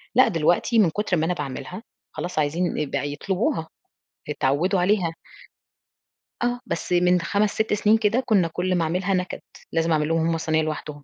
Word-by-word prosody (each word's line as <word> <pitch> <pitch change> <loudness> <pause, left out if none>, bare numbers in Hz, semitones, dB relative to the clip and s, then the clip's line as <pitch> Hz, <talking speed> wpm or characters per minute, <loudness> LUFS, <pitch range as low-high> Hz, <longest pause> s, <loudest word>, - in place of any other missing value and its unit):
لأ، 255 +2 +6
دلوقتي 175 +5 +2
من 195 -6 +5
كتر 190 +1 -1
ما 160 - +1
أنا 180 - 0
باعملها 170 - -6 0.3
خلاص 175 -2 -3
عايزين 165 +4 0
ي 150 - 0
بقى 145 +1 -3
يطلبوها، 190 - -1 0.6
اتعودوا 150 +7 +1
عليها. 180 -2 +2 1.3
آه، 245 0 0
بس 175 - -4
من 180 0 +3
5 205 +4 +1
6 220 -1 0
سنين 210 +1 +4
كده 225 +4 +1
كنا 200 -8 +3
كُلّ 180 +3 -1
ما 170 - +1
أعملها 180 +4 0
نكد، 180 -1 -2 0.3
لازم 165 0 +1
أعمل 155 -1 +2
لهم 165 0 +1
هُم 165 -1 +1
صينية 160 0 +1
لوحدهم. 150 -1 -5
175 Hz, 175 wpm, -24 LUFS, 160-205 Hz, 1.3 s, لأ